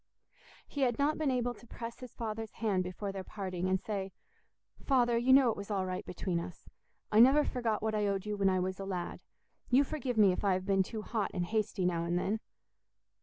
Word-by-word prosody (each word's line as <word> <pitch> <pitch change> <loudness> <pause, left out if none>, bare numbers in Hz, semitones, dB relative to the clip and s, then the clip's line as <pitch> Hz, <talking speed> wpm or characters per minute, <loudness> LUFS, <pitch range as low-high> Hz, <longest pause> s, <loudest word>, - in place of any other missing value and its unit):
He 285 - -4
had 245 -3 +2
not 295 +2 +1
been 305 -3 +1
able 245 -1 0
to 240 - -17
press 230 0 -7
his 255 -3 -10
father's 225 -1 -4
hand 200 -5 0
before 185 +2 -4
their 195 -1 -5
parting, 185 -2 -3
and 190 0 +2
say, 195 -1 -4 0.7
"Father, 245 -3 +3
you 240 +3 +3
know 260 -3 +7
it - - -4
was 200 +1 -7
all 195 -3 0
right 185 0 -3
between 180 -1 -2
us; 175 +1 -8 0.4
I 215 - +5
never 270 +5 +7
forgot 230 -4 -1
what 220 0 0
I 210 -1 +1
owed 195 -1 -1
you 210 0 -2
when 195 -1 +3
I 185 0 +2
was 185 +1 -2
a 195 - -4
lad; 180 -3 -4 0.5
you 260 +3 +5
forgive 265 -5 -3
me 205 -3 +6
if 180 - -3
I 200 -2 +3
have 185 0 -2
been 195 -1 +3
too 215 +3 -4
hot 215 -3 -1
and 175 -1 0
hasty 210 -1 -1
now 170 -2 +1
and 175 +1 0
then!" 200 +5 0
210 Hz, 225 wpm, -32 LUFS, 185-240 Hz, 0.7 s, know